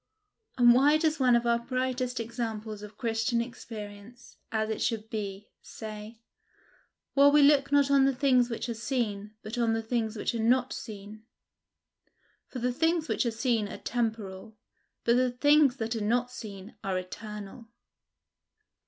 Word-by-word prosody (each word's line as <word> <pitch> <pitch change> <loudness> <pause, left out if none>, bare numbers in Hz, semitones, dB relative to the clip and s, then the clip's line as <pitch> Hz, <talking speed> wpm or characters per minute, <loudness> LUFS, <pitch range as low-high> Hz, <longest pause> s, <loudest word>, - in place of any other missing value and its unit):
And 240 -1 +7
why 285 +5 +5
does 315 -1 0
one 250 -2 +5
of 235 0 +1
our 235 0 +3
brightest 255 0 -2
examples 225 -2 -4
of 210 0 -11
Christian 225 0 0
experience, 225 -1 -8
as 220 -1 0
it 220 - -3
should 220 -2 -2
be, 205 -2 -5
say, 215 0 -9 1.0
"While 285 +1 +6
we 295 0 +6
look 280 -1 +4
not 285 -1 +4
on 275 -1 +5
the 270 -1 +2
things 255 -2 +3
which 230 0 -4
are 235 - -2
seen, 220 -3 -3
but 220 +3 -5
on 230 -1 +2
the 225 0 -1
things 225 -1 -2
which - - -1
are 230 - -3
not 250 +3 +2
seen; 210 0 -9 1.2
for - - -8
the 250 0 -1
things 325 +3 +1
which - - 0
are - - +2
seen 225 -2 0
are - - -7
temporal, 220 -3 -4 0.5
but 235 +1 +3
the 255 0 +3
things 290 +1 +4
that 225 0 -2
are 225 - -3
not 245 +4 0
seen 205 -4 -9
are 190 -2 -1
eternal"? 210 +4 -8
235 Hz, 160 wpm, -29 LUFS, 215-255 Hz, 1.2 s, And